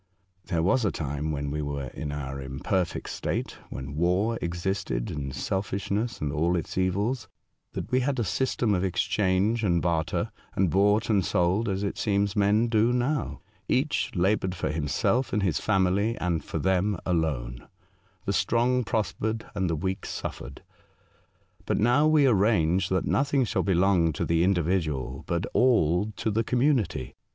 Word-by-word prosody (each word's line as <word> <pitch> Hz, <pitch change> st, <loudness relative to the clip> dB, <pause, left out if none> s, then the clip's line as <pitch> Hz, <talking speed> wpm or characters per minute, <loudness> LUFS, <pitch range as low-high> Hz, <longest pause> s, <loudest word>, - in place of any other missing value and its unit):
'* 95 Hz, 0 st, -41 dB
There 85 Hz, -2 st, +1 dB
was 105 Hz, +8 st, +3 dB
a 105 Hz, -, +2 dB
time, 75 Hz, +1 st, -3 dB
when 70 Hz, -1 st, -3 dB
we 75 Hz, +1 st, -2 dB
were 70 Hz, -3 st, -4 dB
in 75 Hz, +2 st, -5 dB
our 70 Hz, -1 st, -5 dB
imperfect 70 Hz, +7 st, -2 dB
state, -, -, -3 dB
when 65 Hz, +2 st, -6 dB
war 90 Hz, +8 st, +1 dB
existed, 85 Hz, -7 st, -2 dB
and 70 Hz, -2 st, -4 dB
selfish 95 Hz, +6 st, -3 dB
ness 115 Hz, +4 st, -1 dB
and 70 Hz, -2 st, -2 dB
all 85 Hz, +4 st, +1 dB
its 85 Hz, -, -3 dB
evils, 100 Hz, +6 st, 0 dB, 0.5 s
that -, -, -5 dB
we 130 Hz, -, +3 dB
had 135 Hz, +1 st, 0 dB
a 120 Hz, -, +1 dB
system 120 Hz, -1 st, 0 dB
of 90 Hz, -1 st, +1 dB
exchange 95 Hz, +4 st, +1 dB
and 85 Hz, -4 st, +2 dB
barter, 80 Hz, -2 st, -1 dB, 0.2 s
and 95 Hz, -4 st, +2 dB
bought 105 Hz, +3 st, +3 dB
and 100 Hz, -3 st, +3 dB
sold, 95 Hz, +5 st, +1 dB
as 95 Hz, +1 st, -1 dB
it 100 Hz, -, -3 dB
seems 100 Hz, -1 st, +1 dB
men 105 Hz, +3 st, +3 dB
do 115 Hz, +1 st, +3 dB
now. 125 Hz, +3 st, -1 dB, 0.3 s
Each 145 Hz, +4 st, +1 dB
laboured 95 Hz, 0 st, +1 dB
for 85 Hz, -, -2 dB
him 75 Hz, -1 st, -2 dB
self 120 Hz, -, +1 dB
and 105 Hz, -, +1 dB
his 90 Hz, -6 st, +1 dB
family, 100 Hz, +2 st, +1 dB
and 85 Hz, -3 st, -1 dB
for -, -, -4 dB
them 95 Hz, +1 st, +1 dB
alone. 70 Hz, -9 st, -1 dB, 0.6 s
The -, -, 0 dB
strong 125 Hz, +2 st, +2 dB
prospered, 110 Hz, +1 st, -2 dB
and 95 Hz, -4 st, -1 dB
the 80 Hz, -, 0 dB
weak 95 Hz, +5 st, -3 dB
suffered. 65 Hz, -, -6 dB, 1.0 s
But -, -, +1 dB
now 125 Hz, +7 st, +4 dB
we 155 Hz, -2 st, +5 dB
arrange 95 Hz, -6 st, +3 dB
that 95 Hz, 0 st, 0 dB
nothing 140 Hz, -1 st, +2 dB
shall -, -, 0 dB
belong 90 Hz, -3 st, +3 dB
to -, -, -2 dB
the 85 Hz, 0 st, +2 dB
individual, 80 Hz, -8 st, 0 dB
but 85 Hz, 0 st, -1 dB
all 105 Hz, -5 st, +3 dB
to 110 Hz, -, -1 dB
the 110 Hz, +2 st, +1 dB
community. 125 Hz, -, 0 dB
95 Hz, 165 wpm, -27 LUFS, 85-110 Hz, 1.0 s, we